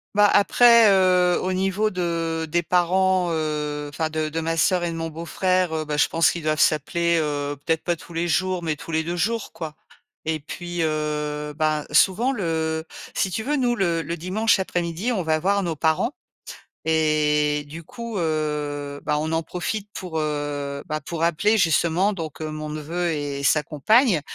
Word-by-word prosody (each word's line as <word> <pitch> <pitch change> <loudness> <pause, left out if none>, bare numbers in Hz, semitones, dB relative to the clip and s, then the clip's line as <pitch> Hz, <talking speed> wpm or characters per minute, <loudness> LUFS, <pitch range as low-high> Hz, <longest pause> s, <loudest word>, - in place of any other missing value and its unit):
Bah, 205 0 +6
après, 235 +1 +6
heu, 180 -2 +4
au 185 - -1
niveau 195 +3 0
de 165 -3 -2
des 170 +1 +1
parents, 180 +1 +2
heu, 150 -2 -2
enfin 155 +2 -2
de 155 -1 -2
de 165 +2 -3
ma 165 +1 -1
sœur 175 +1 +2
et 170 - -2
de 165 - -5
mon 165 0 -3
beau-frère, 175 +2 0
heu, 155 - -1
bah, 150 -1 -3
je 150 - +4
pense 165 0 +3
qu'ils 170 - -5
doivent 155 0 0
s'appeler, 170 +3 +2
heu, 145 -1 -2
peut-être 160 -1 0
pas 175 -1 0
tous 170 - -13
les 170 +1 -1
jours, 185 0 0
mais 155 -2 -1
tous 165 - -9
les 160 0 +1
2 175 +2 -3
jours, 225 +4 -1
quoi 155 -2 -7 0.5
et 160 -1 0
puis, 175 +3 -7
heu, 150 -1 -2
bah, 155 -1 +1
souvent, 195 - +3
le 160 -6 -2 0.3
si 190 - 0
tu 220 +5 -3
veux, 295 +2 0
nous, 245 -2 +1
le 170 -6 0
le 170 - -4
dimanche 195 +7 +1
après-midi, 175 +3 -2
on 205 -6 0
va 160 -1 +1
voir 195 +4 +1
nos 170 -2 -2
parents 160 - +1 0.7
et 150 -2 +2
du 165 +3 -9
coup, 235 +5 -7
heu, 150 -3 -2
bah, 150 - +1
on 160 +1 -2
en 160 0 0
profite 200 +5 -4
pour, 180 -4 -5
heu, 145 -2 -3
bah, 155 -1 -3
pour 165 +3 -4
appeler 205 +7 +2
justement 175 +3 +2
donc 160 -5 -6
mon 155 -1 -5
neveu 165 +3 -2
et 145 -2 -3
sa 150 +1 +3
compagne, 195 - +3
165 Hz, 185 wpm, -23 LUFS, 155-185 Hz, 0.7 s, Bah